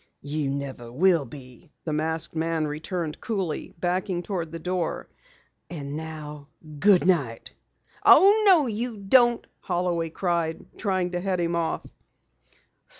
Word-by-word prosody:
"You 145 0 -2
never 135 -4 -5
will 165 +2 +3
be," 130 +4 -13 0.2
the 155 - -2
masked 160 +2 -1
man 160 -1 0
returned 155 +2 -4
coolly, 190 -8 -3
backing 180 0 -1
toward 175 -5 -4
the 165 - -5
door. 180 0 -3 0.6
"And 145 -4 -6
now, 150 -2 -7 0.3
goodnight." 175 - +2 0.5
"Oh, 410 +3 +7
no, 345 -7 +7
you 230 0 -3
don't!" 240 +4 +4
Holloway 175 -2 -1
cried, 170 -1 -2
trying 185 -3 -1
to 175 - -2
head 185 0 -1
him 170 0 0
off. 170 -1 -2
170 Hz, 125 wpm, -25 LUFS, 155-185 Hz, 0.6 s, Oh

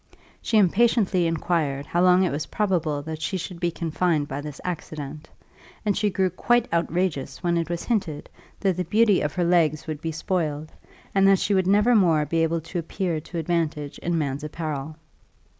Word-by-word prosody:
She 225 - +1
impatiently 200 -2 +3
inquired 155 -4 -1
how 175 +4 0
long 180 +1 +5
it 180 - +1
was 145 +2 -3
probable 165 -8 0
that 160 0 -6
she 190 - -1
should 180 0 -6
be 175 -1 +1
confined 165 -2 0
by 140 +1 -4
this 150 -1 -8
accident; 155 -4 -6 0.6
and 205 -2 +2
she 210 - +1
grew 190 -1 0
quite 240 +6 +2
outrageous 170 -5 -1
when 175 -1 +1
it 170 -1 -1
was 170 -1 -3
hinted, 190 -11 -2 0.3
that 190 -3 +1
the 180 - 0
beauty 210 +3 +3
of 150 -1 -1
her 180 - +1
legs 165 -3 +2
would 155 -2 -5
be 165 - -2
spoiled, 155 -2 -2 0.4
and 195 0 +4
that 195 0 +6
she 205 - 0
would 190 -2 +2
never 210 +5 +4
more 165 -8 +4
be 165 +3 0
able 165 0 +1
to 165 +3 -4
appear 170 0 -2
to 170 +3 -8
advantage 160 -3 -2
in 175 -1 -1
man's 145 -2 -2
apparel. 155 -1 -4
170 Hz, 190 wpm, -24 LUFS, 155-185 Hz, 0.6 s, that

